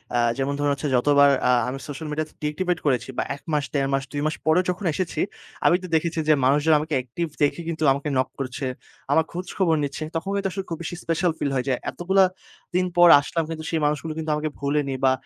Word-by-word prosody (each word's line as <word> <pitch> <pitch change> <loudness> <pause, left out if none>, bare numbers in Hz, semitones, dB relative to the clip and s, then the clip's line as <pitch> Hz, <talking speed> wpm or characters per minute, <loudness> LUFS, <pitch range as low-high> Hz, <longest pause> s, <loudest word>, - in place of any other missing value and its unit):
আ - - +3 0.2
যেমন 135 +1 -1
ধরুন, 145 0 +2 0.3
যতবার 145 +2 +5 0.2
আ - - +6 0.2
আমি 135 +2 -4
সোশ্যাল 150 +2 -6
মিডিয়া 155 +1 -2
ডিএক্টিভেট 165 +4 -1
করেছি 130 -2 +1
বা - - +1
১ 140 - -15
মাস, 145 -2 +1
দেড় 135 -1 +1
মাস, 135 0 +1
২ 145 -1 -3
মাস 155 -2 0
পরে 160 +3 +4
যখন 180 +2 -3
এসেছি, 185 0 -3 0.5
আমি 175 - +6
তো - - -5
দেখেছি 165 +1 0
যে, - - +8
মানুষজন 145 +4 +4
আমাকে 155 +1 -4
অ্যাকটিভ 130 +7 -3
দেখে 145 +4 +2 0.3
আমাকে 140 +2 -3
নক 130 - +1
করছে। 135 +1 -4 0.5
আমার 160 +3 +4
খোঁজ 180 +1 -5
খবর 175 -5 +3
নিচ্ছে, 140 +2 -3
তখন 175 +4 -2
কিন্তু 195 -1 0
আসলে 190 0 -4
খুব 165 - -3
বেশি 175 - -4
স্পেশাল 165 +1 +1
ফিল 140 - 0
হয়। 125 - +1 0.3
এতগুলো 190 +2 +2 0.5
দিন 180 0 +3
পর 175 - +8
আসলাম 165 +3 -2
কিন্তু 160 -1 -5
সেই 160 - 0
মানুষগুলো 150 +2 -1
কিন্তু 160 -1 -2
আমাকে 155 0 -2
ভুলেনি 140 -1 0
বা 130 - +5
155 Hz, 210 wpm, -24 LUFS, 140-170 Hz, 0.5 s, যে